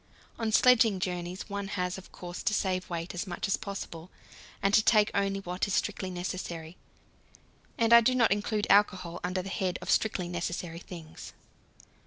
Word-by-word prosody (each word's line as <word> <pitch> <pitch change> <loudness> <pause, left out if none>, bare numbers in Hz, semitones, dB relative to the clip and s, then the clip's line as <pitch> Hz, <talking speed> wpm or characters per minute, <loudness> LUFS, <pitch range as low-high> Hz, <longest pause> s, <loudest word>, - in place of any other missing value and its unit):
On 225 -1 -1
sledging 225 -4 +5
journeys 180 0 -4
one 200 -1 -4
has, 180 0 -1
of 190 - -15
course, 175 0 -7
to 220 -2 +1
save 185 -2 -1
weight 170 0 -4
as 180 +3 -4
much 175 +3 -3
as 195 - +2
possible, 195 -5 -7 0.5
and 195 0 +1
to 215 - +7
take 215 -1 +4
only 195 0 0
what 180 +1 -2
is 200 - 0
strictly 200 -3 -1
necessary; 175 -2 -5 1.0
and 230 0 +3
I 235 - +10
do 255 +3 +2
not 230 -5 +4
include 210 +1 0
alcohol 185 -4 +3
under 180 +1 -1
the 195 - -6
head 185 -2 -1
of - - -3
strictly 195 -5 +1
necessary 175 -1 -4
things. 165 -3 -10
190 Hz, 175 wpm, -29 LUFS, 175-210 Hz, 1.0 s, I